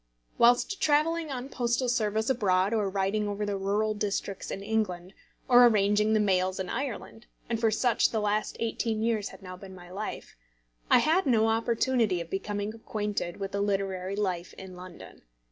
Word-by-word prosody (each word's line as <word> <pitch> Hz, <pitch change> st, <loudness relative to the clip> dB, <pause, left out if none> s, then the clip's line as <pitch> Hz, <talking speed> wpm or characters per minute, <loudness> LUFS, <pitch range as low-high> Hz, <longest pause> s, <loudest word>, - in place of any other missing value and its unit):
Whilst 245 Hz, +11 st, +4 dB
travelling 310 Hz, +2 st, +2 dB
on 255 Hz, -1 st, -4 dB
postal 245 Hz, -1 st, -1 dB
service 220 Hz, -2 st, 0 dB
abroad, 200 Hz, -5 st, +2 dB
or 210 Hz, -3 st, +1 dB
riding 200 Hz, +2 st, 0 dB
over 205 Hz, 0 st, -2 dB
the 205 Hz, -1 st, -2 dB
rural 205 Hz, +3 st, 0 dB
districts 205 Hz, -1 st, -3 dB
in 195 Hz, -, -5 dB
England, 200 Hz, -4 st, -2 dB, 0.3 s
or 245 Hz, -1 st, +8 dB
arranging 210 Hz, 0 st, +3 dB
the 215 Hz, -, +3 dB
mails 190 Hz, -2 st, +1 dB
in 185 Hz, -1 st, -3 dB
Ireland, 240 Hz, -2 st, -5 dB, 0.2 s
and 230 Hz, -1 st, -2 dB
such 230 Hz, +1 st, +2 dB
for -, -, -12 dB
the 220 Hz, -, 0 dB
last 210 Hz, 0 st, -1 dB
eighteen 225 Hz, -1 st, -1 dB
years 225 Hz, -3 st, 0 dB
had -, -, -14 dB
now 185 Hz, -1 st, -8 dB
been 190 Hz, 0 st, -11 dB
my 175 Hz, -1 st, -13 dB
life, 205 Hz, +3 st, -6 dB, 0.5 s
I -, -, +7 dB
had 320 Hz, +2 st, +2 dB
no 225 Hz, -3 st, +3 dB
opportunity 225 Hz, -3 st, +1 dB
of 170 Hz, -1 st, -7 dB
becoming 205 Hz, +2 st, -3 dB
acquainted 210 Hz, -5 st, -4 dB
with 195 Hz, -1 st, -5 dB
literary 195 Hz, -2 st, -1 dB
life 185 Hz, -4 st, -2 dB
in 190 Hz, -1 st, -10 dB
London. 180 Hz, -1 st, -12 dB
210 Hz, 170 wpm, -28 LUFS, 195-230 Hz, 0.5 s, or